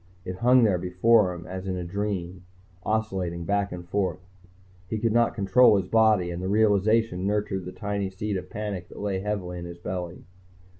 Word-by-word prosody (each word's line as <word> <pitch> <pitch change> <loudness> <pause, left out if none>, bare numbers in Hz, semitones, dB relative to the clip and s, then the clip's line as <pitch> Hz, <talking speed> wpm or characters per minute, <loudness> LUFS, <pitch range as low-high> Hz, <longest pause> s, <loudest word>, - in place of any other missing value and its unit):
It 90 0 -5
hung 125 +2 +5
there 100 -5 +3
before 90 +3 +3
him 85 -2 -8
as 95 +1 -6
in 95 -1 -2
a 90 - -3
dream, 95 -1 -4 0.4
oscillating 95 -5 -2
back 100 +1 0
and 90 -1 -7
forth. 95 -2 -1 0.7
He 110 - -2
could 115 +1 0
not 120 0 +2
control 105 +2 +5
his 95 - -1
body, 110 -5 +3
and 85 +1 -5
the 95 - -2
realization 105 -1 +2
nurtured 100 -3 -1
the 90 - -6
tiny 100 -1 -3
seed 100 +2 -4
of 95 - -5
panic 105 -4 -5
that - - -13
lay 100 -2 -2
heavily 95 -3 -3
in 85 - -7
his 85 0 -8
belly. 90 0 -6
95 Hz, 190 wpm, -26 LUFS, 90-105 Hz, 0.7 s, hung